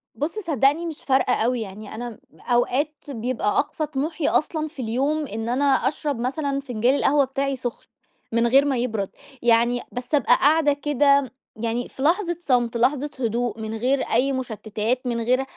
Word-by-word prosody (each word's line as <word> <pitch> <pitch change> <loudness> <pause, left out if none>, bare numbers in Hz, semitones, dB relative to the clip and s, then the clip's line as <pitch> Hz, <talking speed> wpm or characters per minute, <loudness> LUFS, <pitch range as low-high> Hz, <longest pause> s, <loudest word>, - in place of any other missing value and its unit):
بُصّ 330 +9 -3
صدّقني 305 - +2
مش 320 -3 -6
فارقة 265 -2 +2
أوي 240 +1 +1
يعني، 210 +1 -8
أنا 240 -1 -6 0.2
أوقات 255 +5 +1 0.2
بيبقى 245 -2 -2
أقصى 310 - -1
طموحي 300 +2 -2
أصلًا 310 0 0
في 295 -4 -8
اليوم 275 +6 0
إن 225 +1 -4
أنا 270 +4 +1
أشرب 280 0 +1
مثلًا 275 +3 -1
فنجال 250 -1 +1
القهوة 285 0 +3
بتاعي 275 +1 -2
سخن، 245 -2 -6 0.4
من 230 +1 +2
غير 275 +4 +5
ما 270 -3 +1
يبرد، 220 -5 -1 0.3
يعني 240 +1 +3
بس 250 +4 -2
أبقى 250 -3 +4
قاعدة 295 +1 +4
كده 280 -2 +2 0.3
يعني 235 +1 -1
في - - -11
لحظة 345 +2 +2
صمت، 245 -6 +1
لحظة 280 +4 +1
هدوء 235 -2 -1
من 220 0 -4
غير 260 +4 +1
أي 255 +4 +1
مشتتات، 225 -1 -2
من 235 -1 -1
غير 255 +3 +2
260 Hz, 165 wpm, -23 LUFS, 235-290 Hz, 0.4 s, غير